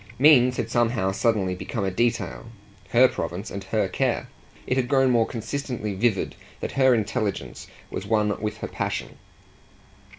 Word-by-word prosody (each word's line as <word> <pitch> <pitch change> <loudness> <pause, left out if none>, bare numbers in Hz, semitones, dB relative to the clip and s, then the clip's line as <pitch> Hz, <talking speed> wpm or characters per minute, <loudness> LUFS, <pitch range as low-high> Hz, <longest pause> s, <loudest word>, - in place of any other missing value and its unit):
Means 125 -3 +6
had - - -2
somehow 115 -5 +1
suddenly 100 -3 +1
become 100 +4 -4
a 95 - 0
detail 115 +3 -1 0.4
her 125 +2 +6
province 90 0 -5
and 100 0 -5
her 95 - 0
care; - - -1 0.4
it 125 - 0
had 130 -2 +1
grown 135 -1 +3
more 115 -2 +3
consistently 120 -3 -4
vivid 100 0 0 0.3
that - - -4
her 130 -2 +4
intelligence 105 -2 -3 0.2
was - - -5
one 105 -2 +1
with 105 0 -3
her - - -5
passion. - - -4
115 Hz, 155 wpm, -25 LUFS, 100-125 Hz, 0.4 s, Means